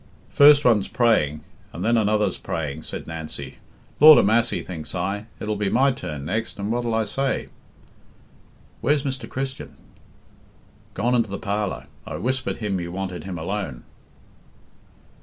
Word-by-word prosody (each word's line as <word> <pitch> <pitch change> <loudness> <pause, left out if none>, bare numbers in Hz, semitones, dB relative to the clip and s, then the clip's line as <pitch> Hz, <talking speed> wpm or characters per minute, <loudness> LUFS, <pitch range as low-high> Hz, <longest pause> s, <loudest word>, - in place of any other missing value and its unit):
"First 145 0 +7
one's 110 -5 +4
praying, 75 - +2 0.3
and 90 - -5
then 115 +1 +3
another's 105 -3 +1
praying," 75 -2 -4
said - - -7
Nancy. 80 -4 -7 0.4
"Lord 155 +1 +10
a - - +5
massy, 115 +3 +2
thinks 85 -1 -7
I, 100 +4 -3
it'll 105 0 -2
be 100 -1 -1
my 135 +5 +3
turn 75 - -6
next, 110 +7 -3
and 100 +2 -3
what'll 120 -1 -1
I 110 - +2
say?" 135 +4 -2 1.3
"Where's 145 +1 +2
Mr. 135 -2 -4
Christian?" 135 0 -5 1.2
"Gone 120 +5 +1
into 115 -3 +2
the 100 - -4
parlour. 100 -10 -3 0.2
I - - -5
whispered 130 +3 -2
him 100 -4 -2
you 85 0 -5
wanted 90 -3 -5
him 95 -2 -5
alone." 80 -6 -4
105 Hz, 145 wpm, -23 LUFS, 85-120 Hz, 1.3 s, Lord